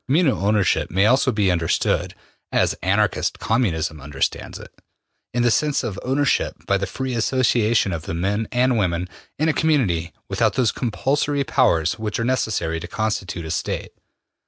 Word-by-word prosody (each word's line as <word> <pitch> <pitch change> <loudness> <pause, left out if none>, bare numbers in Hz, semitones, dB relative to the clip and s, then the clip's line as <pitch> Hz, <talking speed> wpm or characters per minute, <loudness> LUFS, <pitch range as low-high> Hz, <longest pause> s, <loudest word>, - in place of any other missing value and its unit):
Communal 140 - +2
ownership 105 -2 +2
may 95 +2 +2
also 130 +3 +4
be 105 -5 +2
understood, 85 -2 0 0.4
as - - +2
Anarchist 100 +1 +1
Communism 80 - -1
understands 70 0 -3
it, - - -12 0.6
in 120 0 0
the 120 - +3
sense 150 +4 +1
of 100 -4 -4
ownership 135 +2 +1
by 100 0 +1
the 100 - -2
free 130 +6 -4
association 120 -4 +2
of 80 -2 -6
the 80 - -3
men 100 +5 -1
and 125 -1 +2
women 90 -2 0 0.3
in 155 - +1
a 160 - +3
community 105 - +1 0.2
without - - +1
those 125 -4 +2
compulsory 140 +4 0
powers 85 - +2
which 110 0 -3
are 115 - 0
necessary 105 -10 0
to 85 - -7
constitute 100 -3 -3
a 80 - -5
State. - - -3
110 Hz, 160 wpm, -22 LUFS, 90-130 Hz, 0.6 s, also